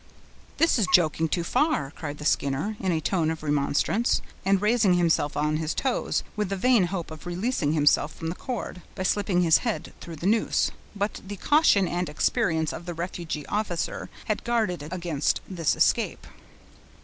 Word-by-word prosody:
"This 330 -6 +3
is 205 - +2
joking 160 -2 +2
too 170 - 0
far," 250 - +1
cried 150 -2 -6
the 150 - -8
Skinner, 145 +9 0
in 190 -2 0
a 160 - +1
tone 160 0 0
of 160 -1 -4
remonstrance, 150 +9 +1 0.2
and 195 +1 +3
raising 210 -2 +3
himself 165 -4 +1
on 150 +1 +1
his 160 0 -2
toes, 265 -3 0
with 210 -3 -1
the 195 - -1
vain 230 0 +4
hope 175 -3 -4
of 155 +2 -9
releasing 175 - -1
himself 150 0 +3
from 160 - -5
the - - -2
cord, 215 -4 -5
by 185 - -3
slipping 185 -2 +1
his 165 -2 +5
head 230 -3 -3
through 170 - -8
the 160 - -7
noose. 215 +3 +2 0.2
But 205 +1 -2
the 205 - -5
caution 215 - +4
and 175 +1 -2
experience 160 +1 0
of 175 - -8
the 175 - -4
refugee 165 -3 -4
officer 205 -5 -2 0.2
had 215 - -2
guarded 220 -8 0
against 170 -5 -1
this 170 -5 0
escape. - - +1
175 Hz, 175 wpm, -26 LUFS, 155-205 Hz, 0.2 s, his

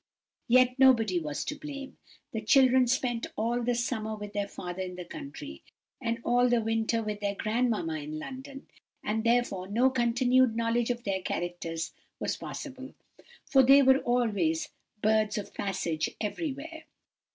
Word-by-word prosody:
Yet 255 +1 +4
nobody 225 -9 +5
was 150 -3 -4
to - - -2
blame; 285 -2 -8 0.4
the 220 - -2
children 260 +1 +5
spent 240 -2 0
all 235 +2 0
the 240 0 0
summer 225 -3 -2
with 210 -1 -8
their 205 -1 -1
father 180 -1 -6
in 180 -1 -5
the 180 -1 -7
country, 140 - -8 0.4
and 230 0 -1
all 245 +1 +3
the 240 -1 +3
winter 225 0 0
with 210 -1 -4
their 200 -1 -2
grandmamma 215 -8 0
in 150 +1 -6
London; 270 - -8 0.4
and, 220 +1 -1
therefore, 230 -6 +1
no 240 +6 +3
continued 250 0 +3
knowledge 230 +1 +1
of 240 -1 -2
their 195 -3 -1
characters 170 -2 -3 0.3
was - - -1
possible, 265 -1 -8 0.5
for 270 - +5
they 275 +2 +7
were 265 0 +6
always 250 +7 0 0.3
birds 215 0 +2
of 205 - -6
passage 170 -5 -2
everywhere. 310 +7 -4
230 Hz, 150 wpm, -29 LUFS, 205-255 Hz, 0.5 s, they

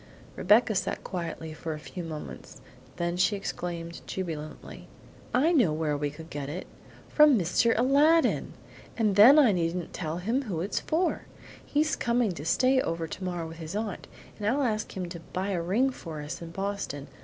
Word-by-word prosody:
Rebecca 215 +4 +4
sat 190 - -2
quietly 165 -3 -5
for 160 +1 -5
a - - -8
few 175 +3 -7
moments, 155 -3 -8 0.4
then 170 +1 -2
she 185 +3 +3
exclaimed 170 -3 -5
jubilantly: 160 -5 -6 0.4
"I 285 +7 +3
know 250 - +4
where 155 -1 0
we 145 0 -1
could 160 +3 -11
get 145 -1 -4
it! 175 +5 -5 0.4
From 300 -4 +6
Mr. 205 +6 +2
Aladdin, 290 +7 +3 0.4
and 215 -4 +2
then 235 +9 +9
I 270 -7 +7
needn't 170 -1 -2
tell 160 -1 -3
him 225 +9 0
who 185 -8 -3
it's 195 - -1
for! 340 +3 -1 0.4
He's 305 +2 +1
coming 235 -3 +1
to 160 -4 -7
stay 260 +9 +3
over 165 -4 -2
tomorrow 175 0 -4
with 165 0 -10
his 165 +3 -6
aunt, 210 -3 -4 0.3
and 205 - -2
I'll 275 +6 +2
ask 215 -5 -2
him 180 -1 -3
to 170 0 -7
buy 190 +2 -1
a 175 -3 -1
ring 220 +11 +2
for 165 -10 -8
us 150 - -6
in 170 - -7
Boston. 195 -6 -4
185 Hz, 180 wpm, -28 LUFS, 165-230 Hz, 0.4 s, then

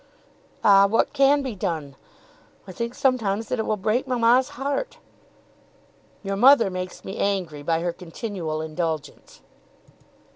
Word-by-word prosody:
"Ah, 200 -1 +6
what 225 +3 +1
can 280 0 +3
be 260 -3 -4
done? 160 -7 -4 0.7
I - - -9
think 235 +5 -5
sometimes 230 -6 0
that 250 - -2
it 220 - -2
will 215 - 0
break 220 +7 -1
mamma's 250 +1 +3
heart." 285 - -3 1.3
"Your 195 0 -2
mother 240 -1 +5
makes 185 0 -6
me 195 - -6
angry 180 -7 -2
by 165 +2 0
her 175 0 -2
continual 170 -3 -5
indulgence." 160 -2 -5
200 Hz, 135 wpm, -24 LUFS, 175-245 Hz, 1.3 s, Ah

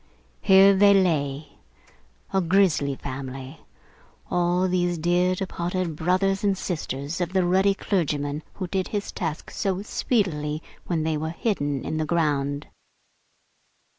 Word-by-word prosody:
Here 195 0 +7
they 200 +1 +6
lay, 150 -6 +1 0.8
a 190 - +3
grisly 170 -6 +2
family, 135 +2 -7 0.7
all 175 +1 +2
these 175 -1 0
dear 175 +3 +2
departed 180 -2 -3
brothers 185 +5 +1
and 200 -2 +2
sisters 155 -2 -4
of 175 +1 -2
the 185 -2 +2
ruddy 190 +2 +3
clergyman 150 -7 -1
who 190 - -4
did 190 +1 -1
his 205 -1 -3
task 160 -3 -4
so 195 -1 -2
speedily 160 - -1 0.2
when 165 -3 0
they 160 -1 0
were 160 +1 -3
hidden 145 - -2
in 155 - -2
the 155 - 0
ground! 145 -4 0
175 Hz, 130 wpm, -25 LUFS, 150-190 Hz, 0.8 s, Here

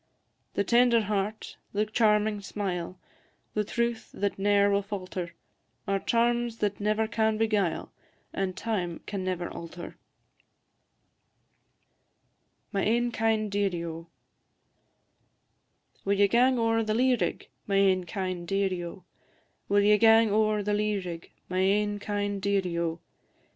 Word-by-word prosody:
The 200 - +2
tender 235 +2 +4
heart, 210 +1 -3 0.2
the 210 +1 +1
charming 210 -1 +2
smile, 185 -3 -4 0.6
The 210 - +1
truth 235 +1 -2
that 200 -1 -2
ne'er 200 0 +3
will 200 0 +2
falter, 185 -3 -5 0.5
Are 195 0 +1
charms 235 +1 +1
that 205 -2 -1
never 215 +1 +1
can 220 0 +1
beguile, 210 -6 0 0.4
And 190 -1 -2
time 185 -7 -2
can 200 -2 -4
never 180 -2 -2
alter. 170 +1 -8 2.7
MY 200 -2 0
AIN 240 +3 +1
KIND 220 -2 0
DEARIE, 195 -4 0
O! 165 0 -7 2.0
Will 200 +1 +1
ye 200 0 +5
gang 250 +4 +3
ower 225 -1 +2
the 215 -1 -1
lea 255 +2 +4
rig, - - -2 0.2
My 200 - 0
ain 190 -2 +3
kind 185 -2 -4
dearie, 190 -1 0
O? 175 +2 -8 0.7
Will 205 0 +4
ye 210 +1 +5
gang 225 -1 +6
ower 215 0 +2
the 205 +1 0
lea 210 0 +1
rig, 175 -3 -6 0.2
My 185 0 -2
ain 205 +2 +2
kind 205 -1 -2
dearie, 190 -4 0
O? 165 0 -2
205 Hz, 130 wpm, -28 LUFS, 190-220 Hz, 2.7 s, gang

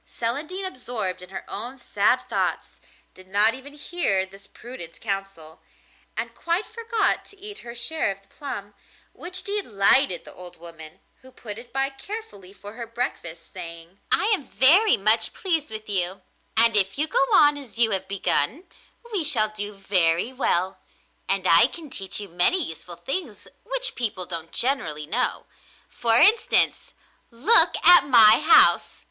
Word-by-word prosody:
Celandine, 300 +12 -6
absorbed 240 - -6
in 180 - -12
her 190 0 -9
own 240 +6 -8
sad 245 - -1
thoughts, - - -4 0.3
did 185 0 -17
not 205 +4 +4
even 265 +2 -11
hear 290 - -1
this 195 +1 -15
prudent 235 -10 -12
counsel, 195 -6 -6 0.6
and - - -4
quite 340 +5 -1
forgot 460 0 -1
to 400 - -12
eat 415 +1 -9
her 235 0 -11
share 240 +3 0
of 195 0 -8
the - - -29
plum, 205 -6 -4 0.4
which 365 +1 -5
delighted 220 - +2
the - - -11
old 180 -1 -13
woman, 165 -2 -14 0.2
who 260 - -17
put 215 -3 -9
it 240 - -16
by 270 0 +1
carefully 270 - -9
for 205 +1 -13
her 235 0 -9
breakfast, 195 - -6
saying: 170 0 -10
'I - - +3
am 355 -10 -3
very 370 +12 +5
much 220 +3 +2
pleased 325 -7 -3
with 215 0 -9
you, 190 -2 -3 0.3
and 230 0 +8
if 195 +1 +4
you 300 - +1
go 305 - 0
on 295 0 +5
as 275 -5 -10
you 230 -2 +1
have 190 -1 -2
begun, 200 - 0 0.5
we 380 -5 -1
shall 235 -8 +2
do 210 -1 -7
very 190 +2 0
well, 185 -7 -1 0.5
and 195 -1 +1
I 165 - +6
can 315 -5 -12
teach 195 -3 -3
you 205 - -6
many 180 - +3
useful 170 - -9
things 340 - -6 0.2
which - - -2
people 210 -6 -4
don't 165 -2 -7
generally 235 - -1
know. 230 +11 -2 0.4
For 230 -1 0
instance, 430 - +2 0.3
look 275 - +4
at 355 0 +9
my 225 -5 +7
house! 315 +2 +4
225 Hz, 160 wpm, -22 LUFS, 190-290 Hz, 0.6 s, at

